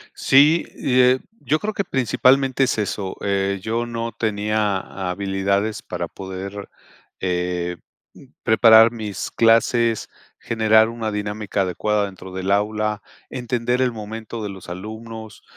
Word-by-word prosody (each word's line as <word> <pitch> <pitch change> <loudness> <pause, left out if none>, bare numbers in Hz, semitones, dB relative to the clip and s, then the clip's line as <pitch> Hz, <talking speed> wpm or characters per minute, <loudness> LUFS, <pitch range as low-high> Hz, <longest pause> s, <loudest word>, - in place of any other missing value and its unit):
Sí, 150 +5 +5
eh, 125 0 +3 0.2
yo 155 - 0
creo 215 +1 -3
que 200 - -1
principalmente 130 - +2
es 130 -3 +1
eso. 100 -2 -3
Eh, 100 -1 0
yo 115 +3 -1
no 115 0 -4
tenía 105 -2 0 0.3
habilidades 100 +2 -1
para - - -5
poder, 95 +1 -7 0.5
eh, 90 -1 -2 0.4
mm, - - -16 0.2
preparar 110 0 +7
mis 105 -5 -5
clases, 115 0 +3 0.3
generar 110 0 +3
una 115 -2 -4
dinámica 105 -1 -2
adecuada 100 +3 0
dentro 95 -1 -10
del 95 +1 -3
aula, 105 +1 0 0.3
entender 125 0 -1
el 125 - +2
momento 110 0 -7
de 105 - -3
los 95 -3 -10
alumnos, 110 +3 -8
110 Hz, 125 wpm, -21 LUFS, 100-115 Hz, 0.5 s, preparar